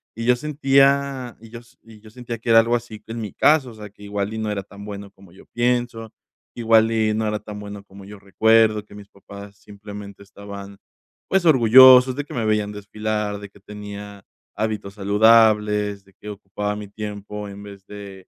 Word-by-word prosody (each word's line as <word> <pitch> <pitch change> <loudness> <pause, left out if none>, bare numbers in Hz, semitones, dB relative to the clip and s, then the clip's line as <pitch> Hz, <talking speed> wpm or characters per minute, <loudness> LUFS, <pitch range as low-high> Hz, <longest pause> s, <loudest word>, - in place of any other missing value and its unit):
y 115 - -6
yo 125 0 +3
sentía, 140 -2 +1
y 115 - -14
yo 115 0 -9
s 120 +1 -22
y 110 -2 -16
yo 110 0 -16
sentía 120 0 -7
que 115 +1 -7
era 115 - +8
algo 120 +1 +1
así 110 -2 -11
en 115 +1 -6
mi 105 - -7
caso, 145 -5 +3
o - - -13
sea 105 -1 -10
que 105 - -24
igual 100 +1 -4
y - - -5
no 110 -1 -3
era 100 -2 -3
tan 100 +1 -13
bueno 100 -1 -8
como 95 -3 -20
yo 95 - -17
pienso, 120 -2 -2 0.4
igual 115 -1 +3
y 110 -1 +1
no 110 0 -1
era 105 0 -1
tan 105 -1 -9
bueno 100 -1 -9
como 100 0 -15
yo 105 0 -11
recuerdo, 110 +2 +2
que 105 - -16
mis 100 -1 -12
papás 100 0 -13
simplemente 100 -1 -11
estaban, 100 0 -11 0.5
pues, 190 -2 +1
orgullosos 130 -1 +7
de 145 - -3
que - - -11
me 115 -3 -2
veían 105 -1 0
desfilar, 105 0 -4
de 100 - -9
que 100 - -21
tenía 105 -1 -10 0.3
hábitos 105 -2 -4
saludables, 105 -1 +3
de 95 -1 -25
que 105 - -11
ocupaba 105 +1 -5
mi 105 -1 -8
tiempo 105 0 -7
en 100 0 -10
vez 100 -1 -12
de 100 -2 -11
105 Hz, 205 wpm, -21 LUFS, 100-115 Hz, 0.5 s, era